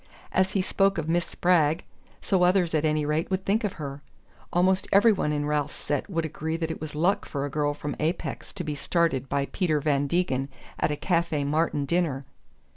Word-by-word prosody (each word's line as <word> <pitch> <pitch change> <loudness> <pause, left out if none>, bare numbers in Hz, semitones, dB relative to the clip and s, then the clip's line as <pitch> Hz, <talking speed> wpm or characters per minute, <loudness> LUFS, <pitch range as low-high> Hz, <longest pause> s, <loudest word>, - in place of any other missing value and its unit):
As 190 +1 +2
he 195 - +1
spoke 195 0 +2
of 160 -2 -2
Miss 170 +1 +1
Spragg, 165 -3 +2 0.4
so 190 -2 +2
others 180 -1 +3
at 155 0 +2
any 155 -1 +1
rate 155 +3 0
would 190 0 -2
think 215 +4 +1
of 205 - -1
her: 140 -2 -6 0.5
almost 185 +2 +2
every 205 +4 +6
one 150 -6 -1
in 145 -1 -1
Ralph's 150 -1 -1
set 145 +4 -3
would 165 -4 -1
agree 160 +1 -3
that 165 -1 -2
it - - -7
was 155 -1 -6
luck 175 +6 +2
for 140 -1 -3
a 145 - -5
girl 145 0 0
from 145 -1 -4
Apex 160 +3 -2
to 185 - -4
be 155 -2 -3
started 145 -3 0
by 140 0 0
Peter 165 -6 +1
Van 145 -1 +1
Degen 135 -5 0 0.3
at - - +2
a 150 - 0
Café 170 -3 0
Martin 150 -1 +1
dinner... 150 -4 0
160 Hz, 205 wpm, -26 LUFS, 145-180 Hz, 0.5 s, every